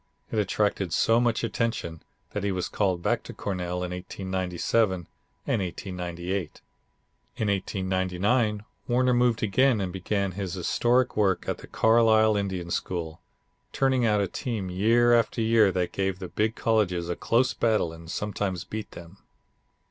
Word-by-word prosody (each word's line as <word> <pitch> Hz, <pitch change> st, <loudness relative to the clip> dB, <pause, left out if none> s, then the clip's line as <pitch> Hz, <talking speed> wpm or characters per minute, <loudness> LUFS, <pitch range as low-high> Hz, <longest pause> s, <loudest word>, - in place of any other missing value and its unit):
It 110 Hz, -, 0 dB
attracted 100 Hz, -3 st, 0 dB
so 115 Hz, +1 st, +3 dB
much 120 Hz, -2 st, +1 dB
attention 115 Hz, -8 st, -2 dB, 0.3 s
that 105 Hz, -, -3 dB
he 100 Hz, -, 0 dB
was 90 Hz, -1 st, -2 dB
called 95 Hz, -4 st, -1 dB
back -, -, +1 dB
to -, -, -10 dB
Cornell 90 Hz, -2 st, -3 dB
in 90 Hz, -, -4 dB
1897 95 Hz, +1 st, -1 dB, 0.4 s
and 105 Hz, -, 0 dB
1898. 90 Hz, -1 st, -4 dB, 0.8 s
In 110 Hz, -, -1 dB
1899 100 Hz, +3 st, 0 dB, 0.2 s
Warner 125 Hz, +1 st, +3 dB
moved 120 Hz, -2 st, +2 dB
again 120 Hz, +3 st, +3 dB
and 95 Hz, -3 st, -3 dB
began 100 Hz, +1 st, -1 dB
his 95 Hz, -1 st, -4 dB
historic 120 Hz, +8 st, +1 dB
work 100 Hz, -3 st, +1 dB
at -, -, -2 dB
the -, -, -11 dB
Carlisle 110 Hz, -1 st, +4 dB
Indian 95 Hz, -4 st, -2 dB
School, 85 Hz, -3 st, -3 dB, 0.5 s
turning 130 Hz, -2 st, +2 dB
out 105 Hz, -3 st, +3 dB
a 100 Hz, -, 0 dB
team 105 Hz, -3 st, -4 dB
year 115 Hz, +6 st, +4 dB
after 115 Hz, 0 st, +2 dB
year 110 Hz, -3 st, +4 dB
that 90 Hz, -1 st, -1 dB
gave 95 Hz, -1 st, -1 dB
the 95 Hz, -2 st, -7 dB
big 110 Hz, +1 st, 0 dB
colleges 95 Hz, -7 st, +1 dB
a 85 Hz, -, -2 dB
close 125 Hz, +2 st, +1 dB
battle 110 Hz, -8 st, +1 dB
and 85 Hz, 0 st, -12 dB
sometimes 95 Hz, -2 st, -2 dB
beat 110 Hz, +3 st, -6 dB
them. 85 Hz, +3 st, -12 dB
100 Hz, 150 wpm, -26 LUFS, 90-110 Hz, 0.8 s, Carlisle